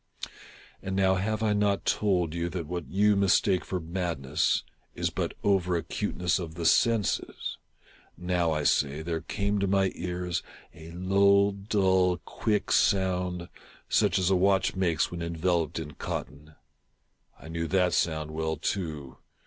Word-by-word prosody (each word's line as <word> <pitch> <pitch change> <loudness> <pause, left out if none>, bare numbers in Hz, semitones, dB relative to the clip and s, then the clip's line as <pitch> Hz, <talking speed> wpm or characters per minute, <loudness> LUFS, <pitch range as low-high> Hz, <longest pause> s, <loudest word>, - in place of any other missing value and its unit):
And 95 0 -4
now 95 -1 +3
have 110 +4 -1
I 105 -1 +2
not 105 -1 +1
told 90 -6 +1
you 85 0 -2
that 85 -2 -4
what 85 0 -5
you 105 +2 +3
mistake 100 -1 +3
for 90 - -3
madness 80 -4 -1 0.3
is - - -1
but - - -3
over 95 -3 +2
acuteness 90 +2 -1
of 80 -3 -6
the 85 0 -4
senses? 115 +3 +1 0.3
— - - -26 0.2
now, 90 -1 0
I 75 -1 -1
say, 75 +1 +1
there 80 -1 -3
came 100 0 -1
to 100 - 0
my 95 0 +2
ears 90 0 -3 0.3
a 80 -1 -12
low, 100 +2 +3
dull, 95 -3 +1
quick 105 +4 -2
sound, 90 -2 +1 0.4
such - - +3
as 95 0 +1
a - - +4
watch 95 +1 +2
makes 85 -4 +1
when 85 -1 -5
enveloped 85 -1 -1
in 80 -2 -5
cotton. 75 +1 -6 0.8
I - - -12
knew 85 0 -3
that 90 0 +2
sound 80 -2 0
well 80 0 -2
too. 80 -6 -4
90 Hz, 150 wpm, -28 LUFS, 80-95 Hz, 0.8 s, a